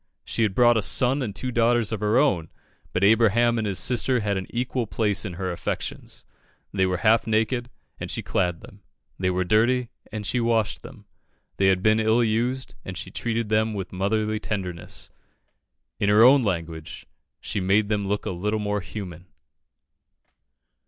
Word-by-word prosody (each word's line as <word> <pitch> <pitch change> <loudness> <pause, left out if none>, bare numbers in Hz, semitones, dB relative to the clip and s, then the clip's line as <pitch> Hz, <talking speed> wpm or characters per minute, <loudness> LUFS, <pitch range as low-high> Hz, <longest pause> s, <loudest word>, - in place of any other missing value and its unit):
She - - -3
had 105 -4 +1
brought 120 -1 +5
a - - +2
son 130 +6 +2
and 105 -6 -4
two 125 +3 -3
daughters 120 -1 +2
of 110 - -2
her 105 +3 +1
own, 100 - +2 0.4
but 90 - -1
Abraham 115 +2 +4
and 110 - -1
his 95 -2 -1
sister 125 +5 +1
had 100 -1 -1
an 95 -1 -4
equal 125 -1 -2
place 105 -1 0
in 95 - -5
her 90 +1 -3
affections. 85 - -5 0.5
They 95 -2 +2
were 90 0 -1
half 110 +1 +4
naked, 115 +3 0 0.3
and - - -5
she - - -4
clad 90 -3 -1
them; 110 -4 -15 0.4
they 90 0 +1
were 90 0 0
dirty, 115 +6 +2 0.2
and 105 -1 -5
she 125 - 0
washed 115 -2 0
them; - - -13 0.5
they 95 - +3
had 95 -1 +2
been 110 0 +4
ill 110 +2 +3
used, 120 +4 -1
and 95 -1 -7
she 95 - -6
treated 115 -2 -2
them 110 0 +1
with 95 -2 -5
motherly 105 +3 0
tenderness. 95 -7 -4 0.9
In 100 - +1
her 105 +2 +6
own 135 +3 +7
language, 85 -6 -4 0.3
she - - -4
"made 100 +3 +2
them 100 -2 -1
look 105 +1 -2
a - - -2
little 105 +5 -2
more 105 -1 -1
human." 90 -3 -8
110 Hz, 180 wpm, -24 LUFS, 95-115 Hz, 0.9 s, own